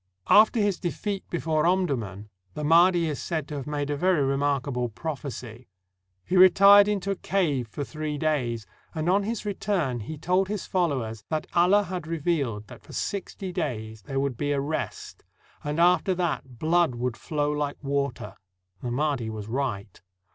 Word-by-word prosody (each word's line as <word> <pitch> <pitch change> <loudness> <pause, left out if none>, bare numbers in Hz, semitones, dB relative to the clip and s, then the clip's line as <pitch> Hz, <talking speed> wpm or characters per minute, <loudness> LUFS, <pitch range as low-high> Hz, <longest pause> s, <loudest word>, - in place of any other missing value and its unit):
After 220 +2 +6
his 205 -3 +1
defeat 195 +2 -4
before 160 -2 0
Omdurman, 120 - -1 0.3
the 150 - -4
Mahdi 170 +2 +5
is 150 -3 -3
said 160 -4 -3
to 150 - -5
have 135 - -6
made 145 -1 -2
a - - 0
very 175 -1 +2
remarkable 135 -2 0
prophecy. 130 -3 -6 0.6
He 185 - -1
retired 200 +2 +8
into 200 -2 -1
a - - 0
cave 155 -11 0
for 115 +7 -5
three 155 0 -4
days, 125 -8 -1 0.3
and 155 +1 -2
on 195 +3 +4
his 220 +2 -3
return 185 -10 -1
he 150 +9 -6
told 180 +5 +1
his 205 -1 -3
followers 130 - -1
that 155 -1 -1
Allah 185 +4 +4
had 180 -3 -5
revealed 150 -10 -1
that - - -13
for - - -14
sixty 195 -1 -4
days 110 - -4
there 135 +7 -3
would 135 -3 -1
be 145 +2 0
a 140 - 0
rest, 150 +3 -4 0.4
and 150 +2 -2
after 180 +2 +4
that 155 -8 -3
blood 165 -1 +2
would 120 0 -2
flow 150 -1 -2
like 145 -1 -2
water. 140 -2 -2 0.4
The 125 - -3
Mahdi 130 -2 -1
was 105 -2 -6
right. 110 -6 -3
150 Hz, 170 wpm, -26 LUFS, 130-180 Hz, 0.6 s, retired